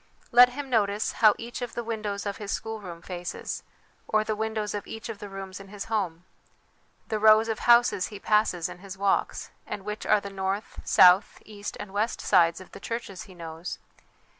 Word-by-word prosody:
Let 245 +1 +8
him 285 +1 -5
notice 210 -4 +1
how 215 -2 +5
each 235 +2 -7
of 245 - -5
the 240 - -2
windows 215 -3 -3
of 200 -1 -3
his 205 -2 -5
schoolroom 200 -7 -5
faces, 175 -1 -5 0.5
or 215 0 +2
the 215 0 -2
windows 220 -1 -2
of 205 - -5
each 225 +2 -7
of 220 -3 -6
the 205 - -8
rooms 195 -1 -7
in 195 - -11
his 200 0 -7
home; 180 -5 -1 0.8
the 215 -2 -1
rows 215 +1 +6
of 220 -1 -2
houses 235 -6 +5
he 205 - -9
passes 210 -5 +2
in - - -10
his 190 0 -9
walks, 200 0 0 0.2
and 195 - -6
which 210 0 -5
are - - +5
the 200 0 -8
north, 195 +2 -3
south, 180 +2 +6
east 205 -1 -7
and 205 -2 -8
west 215 +3 -1
sides 170 -3 +3
of 185 - -13
the - - -10
churches 230 -5 -5
he 185 - -13
knows. 165 0 -6
205 Hz, 195 wpm, -27 LUFS, 190-220 Hz, 0.8 s, Let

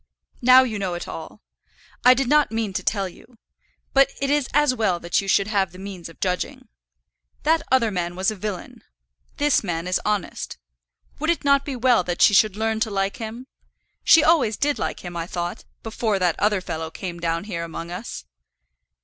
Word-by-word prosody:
Now 255 +1 +7
you 220 -5 -3
know 185 -3 -2
it 175 - -6
all. 165 +6 -9 0.6
I 250 +1 +8
did 270 0 0
not 300 -1 +3
mean 220 -3 -2
to - - -2
tell 200 -3 -1
you; 230 +6 -16 0.6
but 275 0 +5
it 275 0 0
is 290 -2 +1
as 295 -2 +3
well 210 -7 0
that 170 +4 0
you 195 - -8
should 195 +1 +3
have 195 -4 0
the 180 - -13
means 190 -3 -8
of 165 - -16
judging. 180 -1 -3 0.7
That 320 +1 +3
other 240 -4 +3
man 175 -2 -3
was 190 +3 +1
a - - -6
villain. 200 -2 -6 0.5
This 290 -5 +2
man 170 -2 -3
is 180 - 0
honest. 210 - -3 0.6
Would 315 +2 -1
it 340 - +1
not 280 0 +4
be 280 - -4
well 245 -4 +3
that 175 0 -3
she - - +6
should 210 -1 +4
learn 220 0 0
to 220 0 0
like 195 -1 -1
him? 230 +2 -7 0.6
She 325 - +7
always 285 -10 +3
did 290 0 0
like - - -3
him, 175 -1 -8
I 170 0 -3
thought, 175 -1 -4 0.2
before 220 -2 -1
that 180 -3 0
other 205 -2 +2
fellow 160 -2 -5
came 175 +1 -7
down 165 0 -1
here 175 -5 -4
among 165 +1 -7
us." 180 - -7
205 Hz, 200 wpm, -23 LUFS, 180-250 Hz, 0.7 s, I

